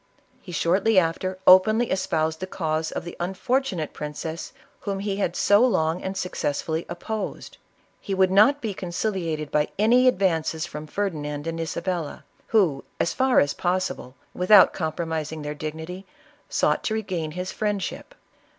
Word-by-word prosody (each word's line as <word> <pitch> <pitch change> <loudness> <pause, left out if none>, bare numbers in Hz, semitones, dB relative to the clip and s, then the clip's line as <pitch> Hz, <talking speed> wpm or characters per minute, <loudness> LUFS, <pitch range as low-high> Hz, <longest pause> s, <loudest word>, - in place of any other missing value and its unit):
He 180 - -10
shortly 190 +6 +2
after 185 +2 +1
openly 215 +6 +6
es 190 0 0
jx>used 160 0 0
the 185 - -4
cause 160 -3 -2
of - - -4
the 175 - -7
unfortunate 190 - -1
princess 155 +2 -5 0.3
whom 200 -2 -3
lie 200 0 -2
had 205 - -1
so 205 +3 +4
long 165 -8 +1
and 190 0 -4
successfully 160 -1 -2
opposed. 210 +5 -5 0.4
He 195 - -3
would 190 -1 +3
not 220 +9 +5
be 220 -3 -2
conciliated 175 -5 -3
by 150 0 +2
any 240 +5 +5
advances 170 -7 +1
from 155 -2 -8
Ferdinand 150 -6 -3
HIM! 165 0 -3
Isabella, 170 -1 -3 0.2
who, 175 -11 +2 0.2
as - - +1
far 260 -1 +3
as 145 - +2
possible, 180 -8 -2 0.2
without 185 +4 +6
compromising 160 -2 -3
their 150 0 -3
dignity, 160 +5 -6 0.4
sought - - +1
to 220 - 0
regain 185 -7 -3
his 180 +2 -4
friendship. 210 - -3
180 Hz, 150 wpm, -24 LUFS, 160-200 Hz, 0.4 s, openly